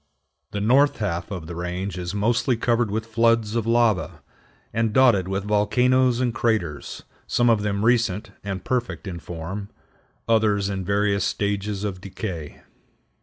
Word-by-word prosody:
The 105 - -4
north 135 +7 +4
half 90 -5 -2
of 90 -6 -5
the 85 - -7
range 90 +2 -4
is 90 +1 -4
mostly 115 +4 +1
covered 120 -1 +1
with 110 +2 -2
floods 115 -1 +2
of 115 -1 -1
lava, 115 -4 +1 0.5
and 115 -1 0
dotted 115 -8 +4
with 95 +1 -2
volcanoes 125 +4 +2
and 125 -2 0
craters, 110 -12 -2 0.2
some 120 -1 +3
of 110 -2 +2
them 105 0 -1
recent 110 -4 +1
and 95 -2 -4
perfect 125 -4 -2
in 85 -2 -5
form, 90 +5 -6 0.6
others 105 -3 +2
in 95 -1 -3
various 100 +1 +1
stages 100 0 -1
of 95 -3 -4
decay. 90 -5 -6
105 Hz, 150 wpm, -24 LUFS, 95-115 Hz, 0.6 s, north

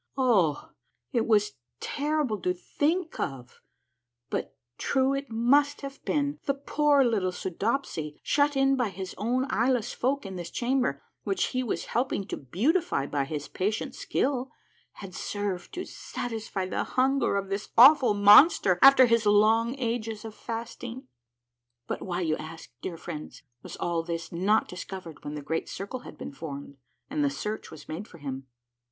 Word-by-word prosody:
Oh, 200 - +2 0.4
it 230 -3 +1
was 210 -2 +3 0.3
terrible 290 -8 -1
to 180 0 0
think 320 - -1
of, 130 -3 -5 0.7
but 135 - -3 0.2
true 265 0 +2
it 275 0 -3
must 280 +6 +3
have 275 -1 -8
been 290 0 0
— - - -37
the 275 - +2
poor 285 0 +3
little 210 -7 +1
Soodopsy, 180 - -3
shut 290 -1 +2
in 270 0 +4
by 245 -5 0
his 190 0 -6
own 245 +5 +1
eyeless 240 0 +1
folk 270 0 -1
in 190 -1 -6
this 175 -1 -6
chamber, 245 - 0 0.2
which 195 -2 0
he 255 - +1
was 245 - -2
helping 240 -5 0
to - - -2
beautify 220 - 0
by 140 -1 -1
his 145 0 -5
patient 215 +7 -2
skill, 265 -1 -1 0.4
had 195 -3 -10
served 195 -2 -4
to 365 - -4
satisfy 220 -5 -5
the 185 - -2
hunger 260 -4 +1
of 195 -1 -3
this 195 +1 -3
awful 260 -2 +8
monster, 205 - +7
after 275 -1 +9
his 230 -2 +2
long 225 +4 +4
ages 225 -3 -3
of 220 - -7
fasting. 235 +3 -6 0.8
But - - -4
why, 180 -1 -3
you 155 -3 0
ask, 160 -3 -9
dear 170 - -5
friends, 160 -2 -8 0.2
was - - -8
all 170 -1 -1
this 165 0 -5
not 195 +6 +2
discovered 180 -3 -8
when 145 +1 -5
the 150 - -6
Great 160 +3 -2
Circle 200 +6 -5
had - - -12
been - - -7
formed, 140 -1 -8 0.3
and 295 +1 -1
the 285 - +3
search 215 -6 -5
was 160 - -12
made 180 +7 -6
for 170 - -14
him 135 -3 -6
220 Hz, 165 wpm, -28 LUFS, 180-265 Hz, 0.8 s, after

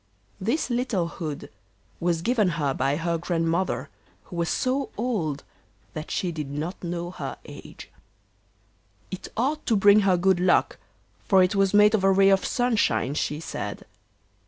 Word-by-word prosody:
This 235 +8 -1
little 240 -8 0
hood 155 -4 -6 0.5
was 170 -1 0
given 230 -3 +2
her 145 -4 0
by 135 +2 0
her 165 +1 -1
Grandmother, 170 +1 -1 0.3
who 180 - -11
was 170 0 -1
so 265 +1 -1
old 190 - -2 0.5
that 155 0 -6
she 180 - -1
did 155 -4 -5
not 155 +7 -5
know 175 0 -4
her - - -6
age; - - -12 1.2
it 185 - -6
ought 285 +6 0
to 230 - +3
bring 205 +1 +6
her 195 -3 +3
good 185 0 +2
luck, 180 0 +2 0.5
for 190 -2 +5
it 185 +3 +1
was 195 0 +2
made 210 +1 +6
of 210 -3 +1
a 195 - +5
ray 195 0 +5
of 195 -1 +3
sunshine, 240 - +1
she 150 0 -2
said. 165 - -6
185 Hz, 160 wpm, -25 LUFS, 165-210 Hz, 1.2 s, bring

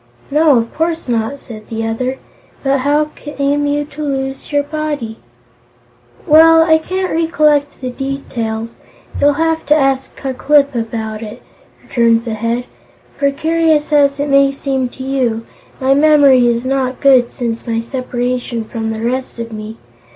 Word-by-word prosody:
"No, 300 -2 +4
of 230 0 -2
course 325 -1 -2
not," 235 +3 -1
said 215 -4 -11
the 225 0 -3
other. 255 +4 -2 0.5
"But 275 0 +2
how 295 +3 +1
came 290 0 -2
you 290 0 0
to 300 +1 -10
lose 270 -2 -3
your 290 0 +2
body?" 290 -7 -4 1.1
"Well, 325 +1 +7
I 320 -1 +4
can't 370 +3 -3
recollect 305 -3 +1
the 255 -1 -3
details; 235 -4 -4 0.4
you'll 290 0 +4
have 320 +2 0
to 300 - +5
ask 270 -2 0
Ku 270 -1 -4
Klip 280 +1 +3
about 225 -2 -4
it," 215 -2 -9 0.4
returned 230 -1 +2
the 230 - -3
Head. 230 +3 -2 0.5
"For, 280 - +3
curious 315 +1 +1
as 280 -1 +3
it 285 - -1
may 275 0 +4
seem 270 -2 -2
to 260 - -9
you, 250 -4 -1 0.3
my 265 +1 +3
memory 285 -4 +5
is 235 +1 0
not 260 -1 -1
good 260 -4 +4
since 235 -2 -4
my 225 -1 0
separation 245 -1 -3
from 225 0 -4
the 220 0 -4
rest 255 +2 -2
of 230 0 -6
me. 215 +1 -7
270 Hz, 160 wpm, -16 LUFS, 235-290 Hz, 1.1 s, Well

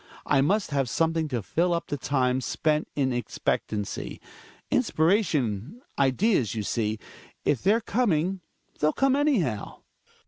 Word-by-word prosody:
I 140 -2 +3
must 195 +5 +1
have 135 -3 0
something 165 +3 +1
to 125 -7 -3
fill 170 - +1
up 170 - -3
the - - -3
time 130 -2 0
spent 150 +4 0
in 130 -3 +1
expectancy. 110 -3 -3 0.5
Inspiration, 160 - +1 0.2
ideas, 135 - +2
you 110 - -2
see 110 0 -1 0.2
— - - -23
if 135 - +2
they're 215 +4 +3
coming 195 -5 0 0.4
they'll 150 +1 +2
come 270 0 +2
anyhow. 205 - 0
150 Hz, 135 wpm, -26 LUFS, 125-195 Hz, 0.5 s, I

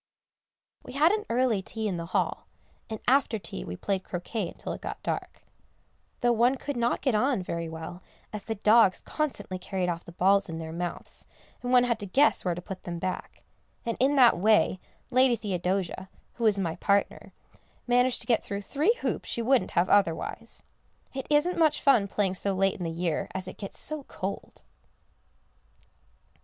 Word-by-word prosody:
We - - -10
had 300 +5 +5
an 425 0 -1
early 235 -4 +2
tea 220 +3 -4
in 185 -4 -2
the 170 0 -5
hall, 185 - -1 0.4
and 220 -1 -4
after 260 -3 +3
tea 165 - -6
we 90 - -6
played 195 -2 -1
croquet 185 +3 -3
until - - -6
it - - -8
got - - -6
dark, - - -4 0.8
though 240 - +4
one 240 +3 +3
could 285 +2 -5
not 235 0 0
get 260 - +2
on 245 -2 +2
very 170 -2 -3
well 160 +2 -7 0.3
as 210 - -5
the 225 - -2
dogs 210 -1 +5
constantly 280 -11 -3
carried 185 -1 -2
off 170 0 -3
the - - -11
balls 195 +2 +3
in 165 - -4
their 160 -1 -6
mouths, 175 0 -5 0.4
and 245 - -3
one 250 -1 +6
had 235 -2 0
to 205 - -4
guess 275 +10 +3
where 180 -2 0
to 175 - -7
put 190 -2 -7
them 170 -1 -5
back, 185 +2 -5 0.4
and 230 -1 -1
in 275 +3 +3
that 245 -9 +6
way 210 -2 +3 0.3
Lady 255 -1 +5
Theodosia, 190 -2 -2 0.2
who 235 - -3
was 210 -2 +4
my 170 -4 -2
partner, 200 0 0 0.5
managed 245 +1 +3
to - - -6
get 230 -3 +3
through 200 -1 -4
three 305 - +2
hoops - - -2
she 235 - -1
wouldn't 245 -6 +3
have 175 +2 +4
otherwise. 195 -6 0 0.5
It 265 -1 -5
isn't 305 +4 +2
much 310 -2 +4
fun 240 -8 +4
playing 195 -1 0
so 195 +1 0
late 195 0 +2
in 180 - -6
the 165 - -2
year, 165 0 -2
as 190 -1 -4
it - - -9
gets 200 - -5
so 305 -1 0
cold. 195 +1 -6
205 Hz, 185 wpm, -28 LUFS, 185-245 Hz, 0.8 s, one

